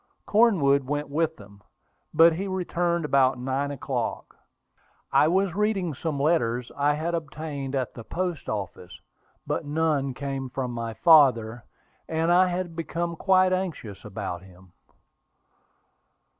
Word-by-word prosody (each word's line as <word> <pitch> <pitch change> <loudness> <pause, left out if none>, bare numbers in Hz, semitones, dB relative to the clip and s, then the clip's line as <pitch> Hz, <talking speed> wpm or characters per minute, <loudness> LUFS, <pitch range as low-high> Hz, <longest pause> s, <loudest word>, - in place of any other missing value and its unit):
Cornwood 175 -12 +4
went 145 +1 -2
with 160 +2 0
them, 100 -1 -15 0.5
but 165 0 +6
he 190 +5 -3
returned 175 -3 -1
about 135 -3 +3
nine 135 +3 -2
o'clock. 140 -2 -4 0.8
I 150 - +5
was 190 +1 +1
reading 200 -5 0
some 145 +1 -3
letters 125 -6 +1
I 145 +1 +2
had 165 +3 -2
obtained 145 -4 -4
at 130 -2 -2
the 115 - -9
post 175 +4 -4
office; 95 -3 -6 0.5
but - - -2
none 145 -3 0
came 135 -1 -4
from 125 -1 -3
my 115 -1 -5
father, 120 -8 +4 0.4
and 160 +1 +1
I 185 +1 +5
had 180 -1 -3
become 170 +1 -3
quite 185 +1 +3
anxious 165 - -4
about 95 -4 -5
him. 95 -1 -18
145 Hz, 130 wpm, -26 LUFS, 125-170 Hz, 0.8 s, but